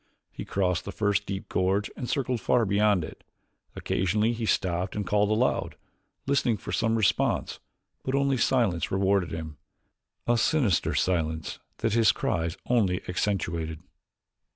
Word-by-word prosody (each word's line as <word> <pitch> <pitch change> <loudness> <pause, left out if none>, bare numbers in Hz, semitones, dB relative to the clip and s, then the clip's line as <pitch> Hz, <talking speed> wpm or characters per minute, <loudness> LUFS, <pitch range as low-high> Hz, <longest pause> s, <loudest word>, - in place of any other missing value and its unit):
He - - -7
crossed 90 -3 0
the 100 - -4
first 100 -1 0
deep 95 0 -4
gorge 95 +3 0
and 125 - -5
circled 130 -4 -1
far 120 -2 +2
beyond 100 -2 +2
it. - - -10 0.5
Occasionally 105 +5 0
he 115 -1 -3
stopped 90 -1 0
and 105 -1 -2
called 105 0 +2
aloud, 110 +4 +1 0.5
listening 135 -5 +1
for - - -7
some 115 -1 +1
response 110 -3 +1 0.4
but 130 - -2
only 140 -1 +2
silence 115 -10 +1
rewarded 95 -2 +1
him 80 -2 -6 0.7
a 120 0 +2
sinister 120 - +2
silence 80 -3 -1 0.3
that 110 - +2
his 115 -1 +5
cries 80 0 -2
only 100 -6 +1
accentuated. 85 -4 -2
100 Hz, 140 wpm, -27 LUFS, 90-115 Hz, 0.7 s, his